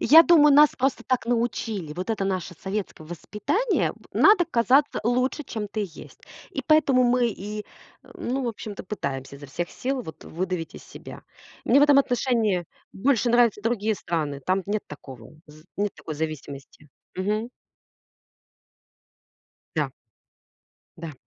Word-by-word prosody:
Я 315 +7 +8
думаю, 300 -4 +6
нас 295 +1 +7
просто 265 +1 0
так 255 -3 0
научили. 225 -8 -1
Вот 180 +5 -5
это 215 -3 -1
наше 185 -1 -2
советское 190 -2 -5
воспитание. 210 - -1
Б - - -21
надо 405 -3 +5
казаться 275 -1 +2
лучше, 250 +6 0
чем 220 -6 -5
ты 215 +1 -4
есть. 180 -6 -8 0.3
И - - -4
поэтому 295 -5 +4
мы 245 0 +3
и, 210 -1 -5 0.5
ну, 260 +2 -3
в 240 - 0
общем-то, 210 -2 -7
пытаемся 140 -8 -5
изо 145 - -11
всех 170 +6 -4
сил 260 0 -3
вот, 160 - -10
выдавить 180 -1 -4
из - - -12
себя. - - -11 0.4
Мне 280 - +5
в - - +6
этом 290 -1 +6
отношении 235 -8 +1 0.3
больше 245 +3 +1
нравятся 235 -3 +4
другие 220 -2 0
страны. 150 -6 -3
Там 185 +1 +1
нет 205 +1 -1
такого 130 -5 -11 0.2
з 155 +1 -16
нет 205 -1 -1
такой 155 - -7
зависимости. 150 -1 -6 0.3
Мгм. 210 +5 -1 2.3
Да. - - 0 1.1
Да. 165 -2 -7
210 Hz, 145 wpm, -25 LUFS, 175-255 Hz, 2.3 s, Я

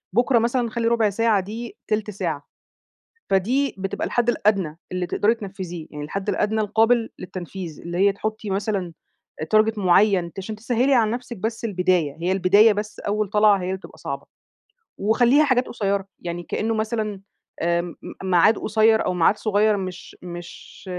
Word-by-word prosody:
بُكرة 240 +1 +4
مثلًا 235 +1 0
خلّي 230 +1 -1
الربع 230 -2 +3
ساعة 220 +1 +2
دي 225 +5 -7
تِلت 215 0 -1
ساعة، 200 - -4 0.8
فدي 245 +9 +1
بتبقى 195 0 -3
الحد 240 -1 0
الأدنى 195 -9 0
اللي 180 -1 -1
تقدري 210 +5 +2
تنفذيه، 185 -6 -7
يعني 150 0 -6
الحد 195 +6 -5
الأدنى 210 +2 +1
القابل 225 +2 +2
للتنفيذ، 180 -2 -7
اللي 170 +1 -5
هي 200 +1 +4
تحطّي 215 +1 -4
مثلًا 195 -3 -2 0.6
target 215 0 +3
معيّن 185 -2 +3
ت - - -14
عشان 215 +3 -5
تسهّلي 245 +4 +1
عن 225 -4 +3
نفْسِك 240 0 -5
بس 225 +4 -3
البداية، 180 -7 +1
هي 180 +2 0
البداية 195 +4 +5
بس 210 +1 -5
أول 210 0 -1
طلعة 210 -1 +5
هي - - -4
اللي 190 +1 -1
بتبقى 190 - -14
صعبة، - - -6 0.7
وخلّيها 240 +8 +4
حاجات 260 -3 +2
قصيّرة، 200 -3 -1
يعني 175 0 -5
كإنه 225 +5 -1
مثلًا 215 -2 -2 0.4
آآ 170 +1 +2
م 175 -1 -7 0.3
ميعاد 190 +4 +4
قصيّر 220 +1 +3
أو 185 - 0
ميعاد 180 +4 +3
صغيّر 215 0 +2
مش 185 -2 -7
مش 175 0 -10
210 Hz, 165 wpm, -23 LUFS, 185-225 Hz, 0.8 s, البداية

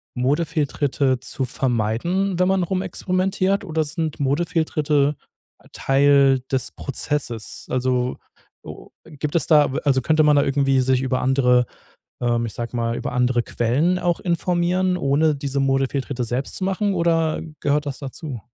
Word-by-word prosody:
Modefehltritte 140 -1 0
zu 130 +1 -3
vermeiden, 130 - 0
wenn 180 - +2
man 190 0 +2
rumexperimentiert 190 +2 -1
oder 160 -3 0
sind 155 0 -4
Modefehlritte 150 -1 +1 0.6
Teil 135 -1 +3
des 130 -2 -1
Prozesses? 135 -5 -4
Also, 125 0 0 0.5
o - - -11 0.2
gibt 150 -1 -5
es 170 - +1
da 150 -4 +4
w - - -1
also 135 -2 +3
könnte 155 +4 +2
man 150 -1 +5
da 140 - +4
irgendwie 135 -1 +2
sich 130 0 +2
über 130 -1 -1
andere, 125 -1 +3 0.6
ähm 120 -1 +1
ich 110 - -8
sage 120 +1 -5
mal, 115 0 -1
über - - -4
andere 125 -1 +1
Quellen 140 +12 0
auch 175 -2 0
informieren, 180 +1 0
ohne 150 0 +2
diese 140 0 -2
Modefehltritte 135 -1 0
selbst 125 +4 -3
zu 190 - -3
machen? 195 +1 0
Oder 165 -2 +1 0.2
gehört 145 +1 +1
das 140 -2 -4
dazu? 140 -2 -7
140 Hz, 145 wpm, -22 LUFS, 130-170 Hz, 0.6 s, man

